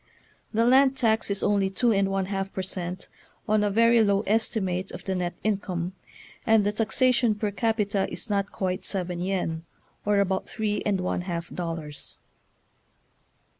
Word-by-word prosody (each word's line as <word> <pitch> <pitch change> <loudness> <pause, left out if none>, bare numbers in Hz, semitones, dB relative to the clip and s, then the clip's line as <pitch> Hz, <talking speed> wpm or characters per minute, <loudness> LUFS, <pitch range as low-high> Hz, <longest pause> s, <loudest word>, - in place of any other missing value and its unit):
The 230 +1 +2
land 265 +2 +5
tax 225 -4 +2
is 200 -1 -1
only 200 -2 +2
two 235 +5 +2
and 195 -2 +2
one 195 -1 0
half 195 0 -3
per 190 - -3
cent, 180 -1 -5 0.4
on 215 0 +3
a 205 - +2
very 230 +2 +5
low 200 -1 +3
estimate 200 -4 0
of 180 - -8
the 190 - -2
net 180 -1 -2
income; 185 -4 -1 0.5
and 220 -2 +4
the 205 - +2
taxation 235 +1 +2
per 210 0 -2
capita 205 -1 0
is - - -4
not 200 -2 0
quite 185 0 -2
seven 180 -3 -2
yen, 180 -3 -1 0.4
or 205 0 +2
about 190 -1 0
three 215 -2 -1
and 195 -3 +1
one 180 - -1
half 170 -2 -4
dollars. 165 -4 -5
200 Hz, 165 wpm, -26 LUFS, 185-220 Hz, 0.5 s, land